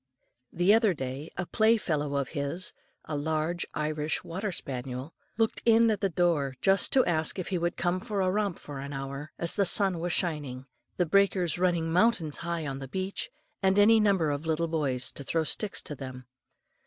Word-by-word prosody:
The 175 +4 +4
other 220 -5 +4
day 135 +3 -5
a 180 - -2
playfellow 170 -11 +1
of 140 -2 -1
his, 150 - -4 0.3
a 155 - -4
large 160 +3 -1
Irish 150 0 -1
water 190 +5 -3
spaniel, 130 -1 -5 0.2
looked 225 -1 +1
in 230 0 +5
at 205 -2 -2
the 195 - +2
door 160 -6 +1
just 195 -1 +3
to 260 - +5
ask 160 -1 +1
if 185 - -4
he 185 -2 0
would 170 +1 -1
come 175 +1 0
for 210 -1 -3
a 185 -1 +2
romp 200 -2 0
for 145 -2 -8
an 140 +1 -6
hour, 140 +2 -6
as 170 - +1
the 200 - +2
sun 190 -1 +3
was 175 +1 -2
shining, 145 -7 -1 0.3
the 180 - +2
breakers 185 -1 +2
running 175 -3 +1
mountains 175 -6 +2
high 170 -2 -3
on 135 -1 -4
the 135 - -6
beach, 190 +7 -3 0.3
and 190 0 +3
any 220 +2 +6
number 195 -7 +3
of 145 +3 -4
little 165 +1 +1
boys 140 -6 -1
to 140 - -9
throw 165 +4 0
in - - -2
sticks 210 +5 0
to - - -3
them. 130 -2 -8
170 Hz, 195 wpm, -28 LUFS, 145-195 Hz, 0.3 s, any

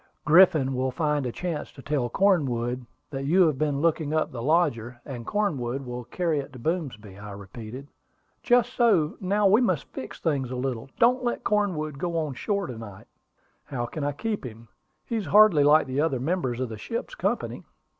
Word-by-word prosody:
"Griffin 155 -4 +5
will 130 +1 0
find 150 -1 0
a - - -3
chance 170 +2 -4
to 135 - -13
tell 140 -5 -1
Cornwood 125 - +1 0.2
that 135 -1 -4
you 180 +5 +5
have 150 -5 0
been 145 -2 0
looking 160 -2 +1
up 155 - 0
the 120 - -6
lodger, 125 -5 +1
and 120 -4 -7
Cornwood 140 - -1
will 125 -1 -6
carry 165 +3 -1
it 140 - -6
to - - -9
Boomsby," 115 - -4
I 105 0 -8
repeated. 110 +6 -9 0.5
"Just 245 0 +3
so. 210 -12 +3
Now, 200 +2 +1
we 205 +5 +5
must 185 - -1
fix 130 - -7
things 140 -6 -1
a 130 - -4
little. 125 -1 -3
Don't 250 +2 +4
let 240 - -2
Cornwood 170 -9 0
go 170 0 -2
on 155 -4 -1
shore 200 +9 -2
to 120 -6 -7
night." 105 -4 -10 0.6
"How 120 -4 -3
can 150 +4 -5
I 145 - 0
keep 210 +7 -3
him? 115 -2 -10 0.4
He 230 - -2
is 210 - -3
hardly 205 -8 +6
like 150 +2 +5
the 130 +2 -1
other 150 -5 0
members 130 -4 -1
of 130 -2 -2
the 110 -2 -7
ship's 230 - -5
company." - - -2
145 Hz, 195 wpm, -26 LUFS, 125-180 Hz, 0.6 s, hardly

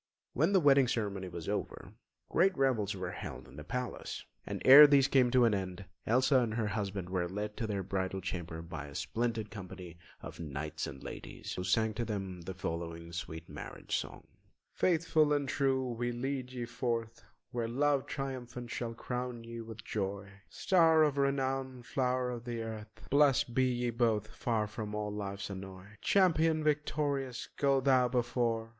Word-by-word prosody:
When 160 +8 +2
the 195 - +5
wedding 140 -4 +5
ceremony 100 -5 -2
was 85 -2 -7
over, - - -4 0.4
great 185 +1 +3
revels 115 -7 +1
were 95 - -4
held - - -7
in 65 - -14
the 75 - -8
palace; 125 +9 -4 0.2
and - - -3
ere 145 +3 +12
these 140 -2 +5
came 130 -3 +4
to 125 -1 +5
an 115 - +3
end, 95 0 -3 0.2
Elsa 130 +3 +4
and 115 -3 -1
her 110 -2 0
husband 100 -3 -3
were 90 -2 0
led 105 +2 -4
to 115 - -2
their 100 -2 -2
bridal 95 0 -2
chamber 85 -3 -5
by 80 -4 -6
a 70 - -11
splendid 115 -2 -2
company 90 -4 -9 0.2
of - - -9
knights 75 0 -4
and 65 - -9
ladies, - - -7
who 90 - -3
sang 110 +4 +2
to 120 +2 -2
them 95 -5 -4
the 95 +2 -6
following 85 -1 -5
sweet 80 -1 -6
marriage - - -5
song: - - -4 0.5
"Faithful 160 -3 +3
and 145 -1 0
true 130 -1 +1
we 120 +1 -2
lead 130 +1 -3
ye 125 -2 -4
forth, 115 -1 -3 0.3
Where 120 -2 -2
love 140 +3 +1
triumphant 125 -4 -5
shall 115 -1 -3
crown 125 -1 -4
ye 115 0 -7
with 110 -1 -9
joy! 100 -1 -3 0.2
Star 165 -4 +4
of 145 -2 +1
renown, 135 -2 0
flow'r 125 0 0
of 120 -1 -6
the 120 -2 -3
earth, 110 0 -8
Blest 140 -4 +4
be 130 +1 +3
ye 125 -1 0
both, 110 -3 +1
far 115 -1 -1
from 105 0 -5
all 105 0 -2
life's 100 -1 -4
annoy. 95 -1 -8 0.2
Champion 165 -5 +3
victorious, 145 -4 -1
go 140 -1 +3
thou 130 -2 +4
before! 120 -2 0
115 Hz, 175 wpm, -32 LUFS, 100-130 Hz, 0.5 s, ere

